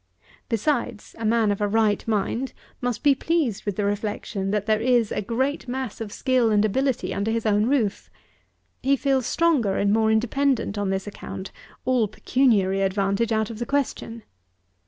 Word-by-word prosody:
Besides, 235 -2 -1
a 225 - -3
man 220 -1 +3
of 205 - -3
a 205 - +2
right 215 -1 +2
mind 225 +4 -1 0.3
must 245 -2 -2
be 290 -1 +6
pleased 275 - -1
with 205 -3 -2
the 205 - -1
reflection, 205 -1 -2
that 205 0 0
there 215 0 +2
is 240 -3 +2
a - - -1
great 260 +7 -2
mass 250 -3 -4
of 215 -2 -5
skill 255 -2 +2
and 210 -1 +3
ability 265 +4 0
under 200 +3 -1
his 225 0 -1
own 210 0 +3
roof. 240 -7 0 0.7
He 275 +1 +3
feels 270 -2 0
stronger 290 -13 +2
and 200 0 +2
more 220 0 +3
independent 240 0 +1
on 205 -2 -1
this 190 0 -1
account, 200 -1 -7 0.3
all 250 -4 +2
pecuniary 205 -4 +2
advantage 195 +3 0
out 220 0 0
of 220 - -8
the 240 - -2
question. 245 -5 -2
225 Hz, 175 wpm, -24 LUFS, 205-255 Hz, 0.7 s, be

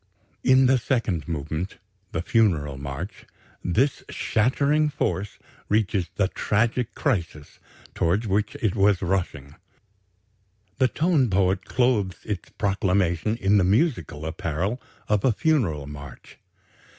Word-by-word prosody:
In 130 0 +5
the 130 0 +4
second 110 - -1
movement 80 +3 -4 0.3
the 80 - -2
Funeral 90 - +2
March 70 +7 -7 0.4
"this 130 - +1
shattering 140 +7 +1
force" 105 -8 -2 0.3
reaches 100 -4 +1
the 100 - +2
"tragic 115 +4 0
crisis" 85 - -2 0.3
towards 95 +7 +1
which 100 0 0
it 105 -4 +1
was 100 -2 +3
rushing. 80 -6 -2 1.2
The 130 - +5
tone 150 -1 +2
poet 95 0 +1
clothes 110 -8 +1
its 100 -5 -4
proclamation 100 0 0
in 100 -1 +3
the - - +3
musical 95 - +1
apparel 85 - -2 0.3
of 105 -2 +1
a 130 - +4
Funeral 110 - +1
march. 70 -3 -11
100 Hz, 115 wpm, -25 LUFS, 85-120 Hz, 1.2 s, In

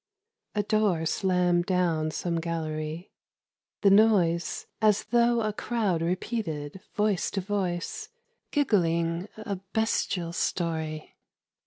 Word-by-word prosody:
A 205 - +1
door 205 -6 +1
slammed 180 0 +2
down 170 -4 +1
some 170 +2 -2
gallery: 160 0 -4 0.7
the 200 - +5
noise 195 -5 +3 0.2
As 210 -2 +4
though 235 +1 +3
a 215 -1 -1
crowd 205 -7 -1
repeated 170 -3 -3
voice 210 -3 +1
to 200 - -2
voice 185 -3 -3 0.4
Giggling 170 - +1
a 215 -3 -4 0.2
bestial 185 -6 0
story. 160 -3 -2
180 Hz, 105 wpm, -27 LUFS, 165-210 Hz, 0.7 s, the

